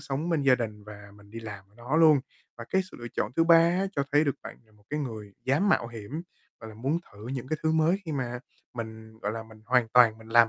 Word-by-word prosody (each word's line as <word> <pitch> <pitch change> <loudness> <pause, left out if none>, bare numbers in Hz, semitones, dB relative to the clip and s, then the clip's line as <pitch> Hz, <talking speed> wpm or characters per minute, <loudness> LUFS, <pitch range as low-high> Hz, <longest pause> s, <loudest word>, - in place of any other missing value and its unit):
sống 140 +5 -3
bên 165 -4 +1
gia 135 -2 +6
đình 105 -4 -5
và 105 -1 -11
mình 100 0 -18
đi 115 +2 -7
làm 105 -4 -8
đó 120 +6 -2
luôn. 155 -3 +6 0.4
Và 115 - -6
cái 190 - +3
sự - - -12
lựa 120 - -6
chọn - - -1
thứ 165 - +4
ba 165 0 +8
á, 170 +4 +3
cho 140 - +2
thấy 145 +2 +5
được 140 - +1
bạn - - -9
là 110 - -27
một 105 -1 -25
cái 150 +1 -1
người 110 -7 -6
dám 140 +10 +2
mạo 120 - +3
hiểm, 120 +7 -6 0.4
gọi 110 - -8
là, - - -12
muốn 135 +9 -1
thử 105 +2 -11
những 130 -1 -4
cái 155 - 0
thứ 160 0 +2
mới 160 +4 +3
khi 160 - -4
mà 125 -3 -2 0.4
mình, 110 -1 -8
gọi 105 -1 -2
là, 115 0 -5
mình 110 -1 -16
hoàn 125 -2 +3
toàn 115 -2 +5
mình 110 0 -14
làm 115 0 +6
120 Hz, 270 wpm, -28 LUFS, 110-150 Hz, 0.4 s, ba